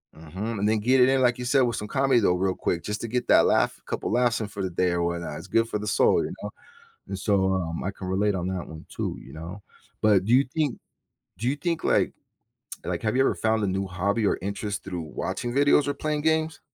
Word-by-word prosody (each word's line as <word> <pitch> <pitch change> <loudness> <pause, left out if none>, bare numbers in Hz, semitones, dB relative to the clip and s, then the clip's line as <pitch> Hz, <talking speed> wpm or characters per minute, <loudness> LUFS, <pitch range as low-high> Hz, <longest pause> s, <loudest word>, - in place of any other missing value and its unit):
Mhm, 95 +8 -5
and 105 - +1
then 110 0 +2
get 130 +5 +3
it 125 - +7
in, 135 -1 +3
like 125 -1 +3
you 125 - -4
said, 135 +1 +3
with 120 -3 +1
some 105 - -4
comedy 135 -1 +3
though, 90 -4 +3
real 95 +1 0
quick, 85 - -2
just 105 +1 -3
to 115 - -3
get 125 +2 -2
that - - +6
laugh, - - +2
a - - -29
couple - - -2
of - - -1
laughs 120 -2 +2
in 105 - -2
for 100 -1 -7
the 95 - -1
day 90 +1 +1
or 85 -1 0
whatnot, 85 -3 -3
it's - - -9
good 115 +4 +1
for 105 - -2
the 105 - -5
soul, - - +3
you - - -5
know? - - -4 0.6
And 95 - -4
so, 95 -1 +2
um, 85 -3 -2
I 100 - -2
can 95 -1 -8
relate 100 +2 +1
on 90 0 -2
that 95 -2 -4
one 80 -1 -10
too, - - -4
you - - -13
know? 85 +6 -8 0.4
But 100 -3 +4
do 115 - +2
you 135 +2 +6
think 150 -6 0 0.6
do 120 - -3
you 140 - 0
think 165 +3 -2
like - - +2 0.7
like, - - -3
have 110 +2 0
you 135 - +5
ever - - +2
found 110 -1 0
a - - +1
new 95 +1 -1
hobby 100 +4 -1
or - - +1
interest 100 +1 -4
through 90 -3 -4
watching 95 +9 -4
videos 145 +1 +4
or 145 - 0
playing 150 +1 -2
games? 160 0 +1
105 Hz, 260 wpm, -26 LUFS, 95-125 Hz, 0.7 s, it